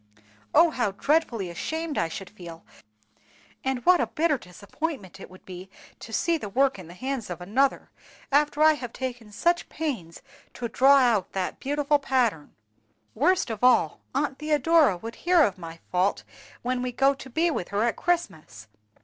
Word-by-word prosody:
Oh, 335 Hz, -, +6 dB
how 240 Hz, -8 st, -1 dB
dreadfully 235 Hz, -, 0 dB
ashamed 320 Hz, -, -4 dB
I -, -, +1 dB
should 185 Hz, +3 st, -8 dB
feel, 170 Hz, -5 st, -11 dB, 1.0 s
and 265 Hz, -2 st, -2 dB
what 360 Hz, -1 st, +6 dB
a -, -, 0 dB
bitter 315 Hz, -4 st, 0 dB
disappointment 200 Hz, -, -6 dB
it -, -, -10 dB
would 185 Hz, 0 st, -16 dB
be 185 Hz, 0 st, -9 dB, 0.3 s
to 225 Hz, -, -10 dB
see 335 Hz, +8 st, +1 dB
the 210 Hz, -, -6 dB
work 265 Hz, +1 st, +1 dB
in 180 Hz, -, -10 dB
the 175 Hz, -, -12 dB
hands 260 Hz, 0 st, -4 dB
of 175 Hz, -, -5 dB
another, 250 Hz, +10 st, 0 dB, 0.4 s
after 295 Hz, +1 st, +3 dB
I 315 Hz, 0 st, +7 dB
have 245 Hz, -5 st, -7 dB
taken 245 Hz, -4 st, -6 dB
such 345 Hz, +11 st, 0 dB
pains 235 Hz, -, -5 dB, 0.3 s
to 240 Hz, -, -4 dB
draw 270 Hz, +5 st, +5 dB
out 235 Hz, -7 st, +2 dB
that 190 Hz, -1 st, -3 dB
beautiful 290 Hz, +1 st, +1 dB
pattern! 245 Hz, -, 0 dB, 0.6 s
Worst 310 Hz, +2 st, +2 dB
of 220 Hz, +1 st, -6 dB
all, 240 Hz, -11 st, +4 dB, 0.2 s
Aunt 275 Hz, -1 st, -1 dB
Theodora 305 Hz, -, +3 dB
would 225 Hz, +6 st, -7 dB
hear 350 Hz, -2 st, +5 dB
of 195 Hz, -7 st, -1 dB
my 165 Hz, -1 st, -9 dB
fault 185 Hz, +2 st, +1 dB, 0.4 s
when 250 Hz, 0 st, -1 dB
we 250 Hz, 0 st, -2 dB
go 270 Hz, +3 st, +3 dB
to 270 Hz, -1 st, -11 dB
be 330 Hz, +7 st, +1 dB
with 180 Hz, -, -3 dB
her 200 Hz, +2 st, -1 dB
at 235 Hz, -, +1 dB
Christmas. 160 Hz, -, -3 dB
250 Hz, 175 wpm, -26 LUFS, 195-295 Hz, 1.0 s, I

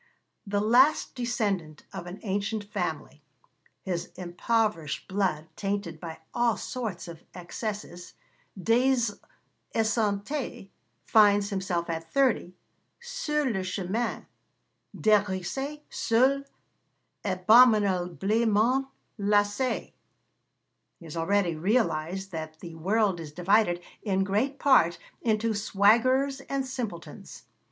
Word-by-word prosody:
The 205 Hz, 0 st, 0 dB
last 250 Hz, +8 st, +4 dB
descendant 205 Hz, -, -2 dB
of 185 Hz, -2 st, -6 dB
an 175 Hz, +2 st, -7 dB
ancient 205 Hz, +1 st, -2 dB
family, 205 Hz, -, -4 dB, 0.6 s
his 180 Hz, -3 st, -3 dB
impoverished 180 Hz, -2 st, -1 dB
blood 185 Hz, -6 st, -1 dB
tainted 195 Hz, -5 st, -3 dB
by 160 Hz, -1 st, -7 dB, 0.2 s
all 240 Hz, -2 st, +2 dB
sorts 220 Hz, -10 st, -5 dB
of 165 Hz, -1 st, -10 dB
excesses, 180 Hz, 0 st, -6 dB, 0.4 s
Des 245 Hz, +7 st, +3 dB, 0.8 s
Esseintes 220 Hz, +1 st, -1 dB, 0.4 s
finds 205 Hz, -2 st, +4 dB
himself 185 Hz, -3 st, -2 dB
at 165 Hz, -1 st, -5 dB
thirty 250 Hz, -9 st, +1 dB, 0.4 s
sur 300 Hz, -12 st, -2 dB
le 215 Hz, -7 st, 0 dB
chemin, 190 Hz, +5 st, -2 dB, 0.7 s
dégrisé, 215 Hz, +8 st, 0 dB
seul, 265 Hz, +4 st, +2 dB, 0.8 s
abominablement 215 Hz, +3 st, +3 dB, 0.3 s
lassé. 205 Hz, +5 st, +1 dB, 1.1 s
He 170 Hz, -, -13 dB
has 160 Hz, -, -8 dB
already 170 Hz, +1 st, +1 dB
realised 190 Hz, -1 st, 0 dB
that 155 Hz, -1 st, -6 dB
'the 170 Hz, -2 st, -9 dB
world 190 Hz, +3 st, +1 dB
is 155 Hz, -3 st, -7 dB
divided, 180 Hz, +2 st, +2 dB, 0.2 s
in 195 Hz, -2 st, +1 dB
great 215 Hz, +9 st, 0 dB
part, 170 Hz, -13 st, +4 dB, 0.2 s
into 225 Hz, 0 st, +1 dB
swaggerers 235 Hz, +7 st, +3 dB
and 275 Hz, -1 st, -1 dB
simpletons.' 235 Hz, -10 st, -7 dB
205 Hz, 95 wpm, -27 LUFS, 180-235 Hz, 1.1 s, last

